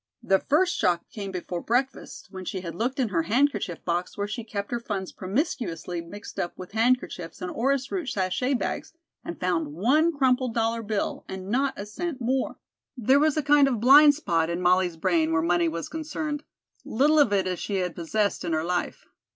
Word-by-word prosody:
The 195 0 +3
first 350 +5 +2
shock 175 -1 +1
came 200 -3 -5
before 180 -2 -4
breakfast 250 -3 -2
when 185 -2 -7
she 185 +1 -4
had 170 -2 -6
looked 245 - -2
in 245 -4 +1
her 170 -4 +1
handkerchief 225 - 0
box 175 +2 -2
where 205 0 -1
she 225 +3 -5
kept 205 -1 -5
her 240 - -1
funds 200 -5 -4
promiscuously 185 - -3
mixed 205 +5 -9
up 175 - -3
with 185 - -9
handkerchiefs 225 -7 0
and 180 - -4
orris 270 +2 0
root 360 -7 -2
sachet 235 +6 0
bags - - -3 0.3
and 170 - -7
found 165 -5 -1
one 290 - +3
crumpled 255 -4 +1
dollar 230 0 +1
bill 210 -1 -2
and 190 +1 -6
not 270 +3 +1
a 200 - -5
cent 290 +7 -4
more. 255 +2 -1 0.4
There 260 +4 +4
was 310 0 +2
a 305 - +1
kind 290 -1 +5
of 245 -5 0
blind 290 +5 +8
spot 165 - 0
in 170 +1 -2
Molly's 180 -1 +2
brain 165 -2 +1
where 160 0 +2
money 175 0 +2
was 165 0 -3
concerned, 305 -2 -4 0.4
little 295 +6 +3
of 280 -8 +5
it 195 -2 +2
as 185 -1 -2
she 205 - -3
had 180 -3 -1
possessed 200 +4 -1
in 170 -2 -2
her 155 0 0
life. 180 +1 -2
210 Hz, 200 wpm, -26 LUFS, 180-265 Hz, 0.4 s, blind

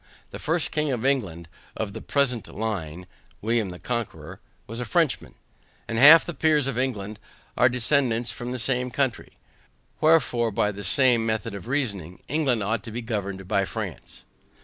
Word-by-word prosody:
The - - -8
first 165 +1 -1
king 150 -1 0
of 125 -1 -3
England, 95 -12 -1 0.3
of 105 -3 -4
the - - -7
present 130 -5 0
line 90 -6 -5 0.3
(William 115 -2 0
the 90 - -8
Conqueror) 120 +1 -5 0.3
was 115 +2 -7
a 125 - -3
Frenchman, 165 +1 0 0.5
and 115 0 -2
half 155 +5 +9
the 175 - -5
Peers 155 -3 +2
of 135 -3 -2
England 110 -5 -3 0.4
are 120 - +4
descendants 125 -1 0
from 125 0 -6
the 130 - -3
same 125 +1 -1
country; 130 -2 -2 0.7
wherefore, 145 -7 +3
by 105 0 0
the 100 0 -8
same 120 +4 +6
method 110 -1 -2
of 100 -1 -8
reasoning, 100 - -3
England 135 -7 0
ought 110 +2 -1
to 115 - -7
be 120 +3 -5
governed 100 -4 -4
by 100 -1 +1
France. - - -7
120 Hz, 170 wpm, -24 LUFS, 105-135 Hz, 0.7 s, half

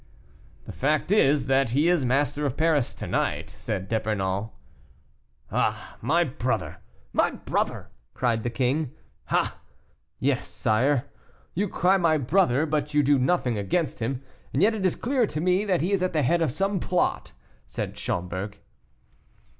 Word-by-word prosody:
"The - - -7
fact 150 +6 0
is, 145 -9 +4
that 135 -1 +2
he 150 +3 +4
is 175 -5 +3
master 140 +3 +1
of 140 -3 -1
Paris 155 -5 +2
to - - -6
night," - - -1
said 95 +1 -4
D'Epernon. 105 -1 -1 1.0
"Ah, - - -1
my 160 +9 +3
brother! 130 -4 -2 0.4
my - - +3
brother!" - - -3 0.2
cried 120 -3 +1
the 120 - -2
king. 130 +3 -1 0.3
"Ah! - - 0 0.6
yes, - - 0
sire; 130 +5 +1 0.5
you 200 +3 -1
cry, 185 +3 +3
'my 165 -4 +3
brother,' 145 0 +2
but 150 -1 -2
you 150 - +5
do 140 0 +4
nothing 125 -5 +1
against 150 - -1
him; 125 +3 -2 0.3
and 140 - +2
yet 220 +2 +5
it 200 -4 +1
is 180 - -1
clear 250 -2 +1
to 150 - -4
me 180 +4 +2
that 185 -4 +1
he 180 +5 0
is 195 -2 +2
at 185 -1 0
the 155 -2 +2
head 170 +7 +2
of 165 - +2
some 195 +5 0
plot." 180 +1 -1 0.3
said - - -4
Schomberg. 95 +3 -3
145 Hz, 160 wpm, -26 LUFS, 125-175 Hz, 1.0 s, you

